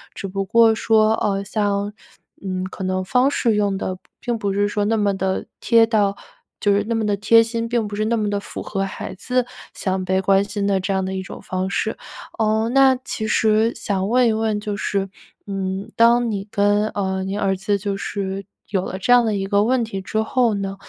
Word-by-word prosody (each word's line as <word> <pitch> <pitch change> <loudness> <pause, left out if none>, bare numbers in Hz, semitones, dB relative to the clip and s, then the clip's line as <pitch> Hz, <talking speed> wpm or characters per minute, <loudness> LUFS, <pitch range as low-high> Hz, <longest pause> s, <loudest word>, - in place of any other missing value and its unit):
只 195 - -5
不 195 +1 -2
过 225 +3 +5
说， 220 -1 +3
呃， 200 -2 -1
像 205 0 -1 0.5
嗯， 185 -1 -3
可 190 - -7
能 185 0 -1
方 250 +7 +3
式 230 -6 +1
用 205 -2 +1
的 185 -1 -3 0.2
并 240 -1 -2
不 200 -2 -2
是 205 +1 +1
说 205 0 -1
那 225 +2 +1
么 205 -2 +1
地 190 0 -1
贴 230 -1 +5
到 205 -3 +1 0.4
就 205 - +2
是 200 +1 +2
那 230 - +1
么 225 -1 0
地 205 -1 +1
贴 225 +3 +5
心， 230 0 -3
并 230 -3 0
不 205 - -6
是 215 +1 -1
那 230 +1 +1
么 210 -2 0
的 205 0 -1
符 200 - -7
合 195 -2 -2
孩 190 -1 -5
子 250 +5 -1 0.3
想 190 -1 -2
被 190 +1 +1
关 195 +1 +3
心 205 0 -3
的 195 -1 +2
这 190 +2 -2
样 190 0 0
的 190 - -3
一 190 - -2
种 - - -9
方 185 0 -3
式。 220 +2 -2 0.4
嗯， 220 +1 +1
那 270 -1 +6
其 220 -3 -5
实 220 +2 +2
想 200 -2 -2
问 250 0 +4
一 225 - +2
问， 220 -1 0
就 210 -1 -4
是， 195 -1 -2 0.4
嗯， 195 +1 -3
当 235 +1 +4
你 200 0 -4
跟 205 +1 +2
呃， 190 -2 -2
您 195 +2 -3
儿 195 -1 +1
子 200 +2 0
就 200 0 -3
是 195 -1 -4 0.2
有 190 -2 -1
了 190 - -5
这 245 +6 +3
样 245 -1 +6
的 215 -2 0
一 195 -1 -2
个 200 +1 +2
问 245 +2 +2
题 195 -4 -5
之 215 +3 -1
后 235 -1 +1
呢， 195 0 -4
205 Hz, 240 characters per minute, -21 LUFS, 195-225 Hz, 0.5 s, 那